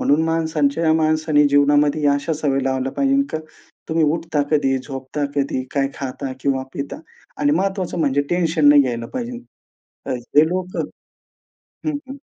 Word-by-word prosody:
म्हणून 145 +3 +3
माणसांच्या 160 -1 0
या 160 - +4
माणसाने 155 -1 +3
जीवनामध्ये 145 +1 +3
अशा 145 +3 +1
सवयी 135 -2 0
लावल्या 130 0 -1
पाहिजे, 275 0 +2
का 160 - -2 0.5
तुम्ही 160 0 +2
उठता 155 -1 0
कधी, 140 -3 +2
झोपता 135 +2 -5
कधी, 135 -2 0
काय 135 -1 +1
खाता 135 0 -5
किंवा 135 -1 0
पिता 140 - -5 0.4
आणि 290 0 +2
महत्त्वाचं 190 - -1
म्हणजे 145 -2 +2
टेन्शन 165 -4 +3
नाही 145 -1 +7
घ्यायला 120 -2 -3
पाहिजे. 245 -1 -4 0.7
हे 130 +5 +2
लोकं 185 0 -2 1.0
हं, 300 -2 0
हं. 270 - -7
150 Hz, 145 wpm, -21 LUFS, 140-165 Hz, 1.0 s, नाही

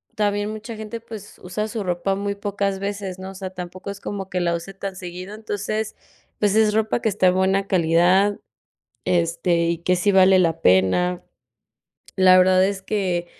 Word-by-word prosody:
también 205 0 0
mucha 215 +1 -7
gente, 220 +1 -6
pues, 220 -3 -10
usa 200 +4 -3
su 220 -1 -4
ropa 180 +1 -1
muy 200 +1 -2
pocas 200 -1 -2
veces, 200 -2 -4
¿no? 190 0 -7
O 195 - -10
sea, 190 -1 -6
tampoco 180 +1 -7
es 200 - -9
como 195 -2 -5
que 180 -1 -2
la 170 -1 +1
use 170 +4 -7
tan 195 0 -6
seguido. 185 +2 -8
Entonces, 215 0 -4 0.4
pues, 205 -1 +2
es 220 -1 +4
ropa 220 +2 +1
que 225 - 0
está 195 -2 +2
de 180 - +4
buena 190 +1 +1
calidad, 180 +3 +3 0.7
este, 170 0 +1
y 170 0 0
que 180 +2 +1
sí 180 +3 +1
vale 190 -1 +6
la 165 -2 +1
pena. 95 - +3 0.9
La 185 -1 +6
verdad 185 0 +5
es 195 0 -2
que 185 -4 -1
190 Hz, 185 wpm, -22 LUFS, 180-205 Hz, 0.9 s, vale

